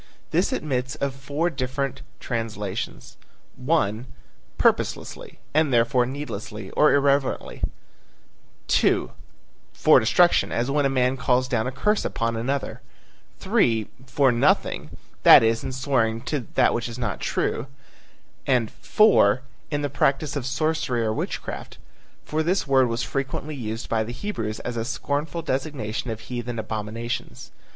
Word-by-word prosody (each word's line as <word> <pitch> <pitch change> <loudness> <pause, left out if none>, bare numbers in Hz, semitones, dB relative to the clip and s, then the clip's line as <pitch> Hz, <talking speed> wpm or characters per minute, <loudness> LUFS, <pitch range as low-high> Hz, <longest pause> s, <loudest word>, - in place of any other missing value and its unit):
This - - +2
admits 130 -2 -2
of 140 -3 -2
four 145 +5 -2
different 135 -1 -3 0.2
translations: 110 -3 -4 0.4
(1) 125 -5 0 0.5
Purposelessly, - - 0 0.2
and 155 -1 +3
therefore 120 +1 +3
needlessly 110 -7 -6
or 150 - +4
irreverently; 140 -1 +1 1.1
(2) - - +2 0.6
for - - +6
destruction, 175 +10 +3
as 120 +3 0
when 145 -1 +2
a - - -1
man 130 0 +1
calls 125 0 +1
down 120 -3 0
a - - -2
curse 210 +11 +1
upon 115 0 -1
another; 130 +5 -2 0.6
(3) 110 -3 +1 0.2
for 135 0 +3
nothing, 120 - +1 0.2
that - - +9
is 115 0 +1
in - - -3
swearing 125 -4 0
to 135 -2 -3
what 120 0 +2
is 120 - -7
not 110 -6 -3
true; 115 - -1 0.8
and 125 -5 +2
(4) 130 - +4 0.3
in 145 -1 -2
the - - +1
practice 140 +1 0
of 135 -3 -3
sorcery 135 -3 0
or 110 -1 0
witchcraft, - - -5 0.5
for 155 +1 -1
this 180 +5 +1
word 135 -2 +4
was 115 0 -2
frequently 135 +2 -3
used 115 -4 -5
by 110 -1 +1
the 120 +2 -6
Hebrews 115 - -4
as 125 -1 -4
a 115 - -1
scornful 145 +6 -3
designation 130 -6 -3
of 110 -1 -4
heathen 120 -1 -5
abominations. 110 +2 -5
130 Hz, 135 wpm, -24 LUFS, 115-140 Hz, 1.1 s, that